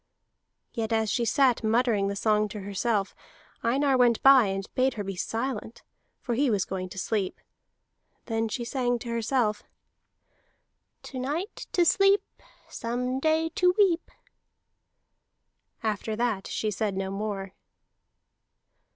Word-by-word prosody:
Yet 225 -2 -3
as 220 -1 +1
she 235 - 0
sat 255 -1 +3
muttering 220 -2 +2
the 200 - -2
song 210 +1 +2
to 210 0 -7
herself, 200 +1 -1 0.5
Einar 270 +4 +2
went 240 -2 +4
by 270 -5 +7
and 195 0 -3
bade 260 +1 +1
her 210 - -3
be 195 -1 -5
silent, 225 +3 -4 0.4
for 240 - -3
he 270 +3 +2
was 205 -4 +1
going 185 -1 -4
to 190 - -11
sleep. 195 0 -2 0.9
Then 225 -1 -1
she 235 +3 -3
sang 245 -1 0
to 235 0 -8
herself: 230 -2 0 1.4
"To 260 - -7
night 305 - -4
to 350 - +4
sleep, 395 +3 +4 0.4
Some 250 +2 -3
day 315 +2 +2
to 360 +2 +2
weep." 380 -5 +3 1.7
After 215 0 -2
that 225 -4 -1
she 215 - -2
said 200 0 -2
no 190 0 -2
more. 195 -1 -4
230 Hz, 135 wpm, -27 LUFS, 205-260 Hz, 1.7 s, by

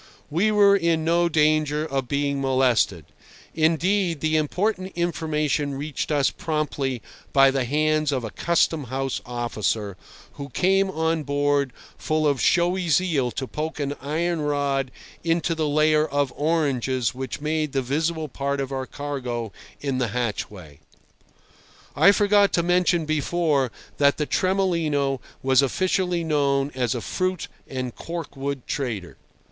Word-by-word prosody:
We 180 +8 +2
were 205 -1 +5
in 165 -4 +1
no 170 +1 +3
danger 155 -1 +2
of 135 -4 -2
being 140 +1 -1
molested; 125 - +2 0.5
indeed, 165 +2 +1
the 155 +1 0
important 185 +5 0
information 155 -4 -1
reached 145 +2 -4
us 145 -2 +2
promptly 145 -5 -2 0.3
by 135 -1 +6
the 135 -2 0
hands 155 +2 +1
of 130 -3 -1
a 110 - -5
Custom 165 -3 +1
house 135 +2 -3
officer, 110 -4 -2 0.3
who 140 0 -8
came 195 +6 +2
on 160 -2 0
board 145 -1 +1 0.3
full 155 0 0
of 140 -3 +1
showy 175 0 +2
zeal 155 -5 +2
to 130 - -4
poke 155 +4 -5
an 145 0 -2
iron 160 +4 -1
rod 140 -2 0 0.3
into 165 0 +1
the 160 -2 -1
layer 155 +1 +3
of 140 -2 -1
oranges 135 -6 0
which 130 +1 -5
made 155 0 -1
the 135 -1 0
visible 155 +4 -1
part 140 0 -3
of 135 -1 -3
our 130 -1 -3
cargo 125 -6 -4 0.3
in 135 -2 -1
the 125 - +1
hatchway. 105 -9 -4 1.2
I 200 - +7
forgot 205 -1 +4
to 170 - +2
mention 175 -1 +2
before 155 -3 +1 0.3
that 140 -1 +4
the 150 - 0
Tremolino 160 -9 0 0.2
was 130 0 +4
officially 180 +4 0
known 140 -3 +1
as 125 -1 -1
a 120 - -3
fruit 185 - -2 0.2
and 130 -2 -4
cork 165 -3 -6
wood 135 -1 -4
trader. 115 -11 -4
145 Hz, 140 wpm, -24 LUFS, 135-165 Hz, 1.2 s, I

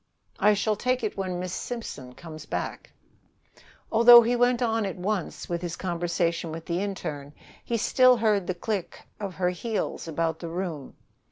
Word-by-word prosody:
"I 210 0 +5
shall 210 +1 +1
take 250 +3 -1
it 215 - -2
when 185 -2 -3
Miss 185 0 -4
Simpson 145 - -6
comes 160 -2 -10
back." - - -4 1.0
Although 235 +1 +9
he 240 +2 +1
went 245 0 +3
on 225 -1 +1
at 195 -2 -3
once 190 0 -3
with 170 -1 -3
his 175 -1 -4
conversation 170 -2 -1
with 165 +1 -7
the 170 +1 -1
interne, 150 -8 -5 0.3
he 235 - -1
still 255 +2 +5
heard 210 -5 +1
the 185 - -1
click 195 0 -4 0.2
of 200 -3 -5
her 180 -1 +1
heels 210 0 -3
about 165 0 -1
the 170 - -6
room. 165 -5 -5
185 Hz, 170 wpm, -26 LUFS, 170-225 Hz, 1.0 s, Although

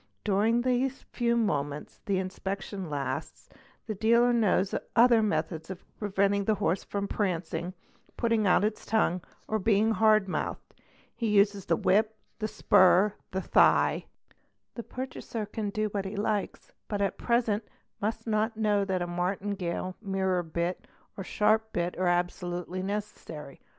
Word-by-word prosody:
During 215 +4 +2
the 255 +1 +2
few 240 -2 -2
moments 145 -9 -2
the 195 -2 +1
inspection 190 0 -4
lasts 145 -2 -4 0.4
the 220 - -3
dealer 235 +4 +4
knows 205 -4 +2 0.2
her 235 -1 +6
methods 160 -5 -1
of 190 -1 -8
preventing 200 -1 +1
the 215 - +2
horse 195 -2 0
from 200 0 -3
prancing, 180 -2 -2 0.4
putting 230 -3 +2
out 185 - +4
its 215 0 -1
ngue, 185 -5 +1 0.3
or 220 - 0
being 215 +2 +3
hard 215 -2 +4
mouthed; 185 - -4 0.4
he 230 - -2
uses 200 -2 +3
the 165 - +3
whip, 215 +6 +2 0.2
the 215 - -1
spur, 190 0 +4 0.2
the 190 - -2
thigh; - - +3 0.7
the 235 - -5
purchaser 250 -3 -5
can 210 0 -4
do 215 +1 -1
what 200 -1 -3
he 195 +2 -5
likes, 205 0 -2 0.2
but 205 - -2
at 200 -1 -1
present 230 -3 +1 0.4
must 220 +2 -2
not 220 0 0
know 210 -2 +2
'that 190 -2 -1
a - - -2
martingale, 185 0 -2
mirror 190 -3 0
bit, 170 +2 -3 0.3
or 195 - -5
sharp 220 +3 +1
bit 175 0 -1
are 185 - +1
absolutely 175 +1 -1
necessary. 195 -8 -6
200 Hz, 145 wpm, -29 LUFS, 185-220 Hz, 0.7 s, her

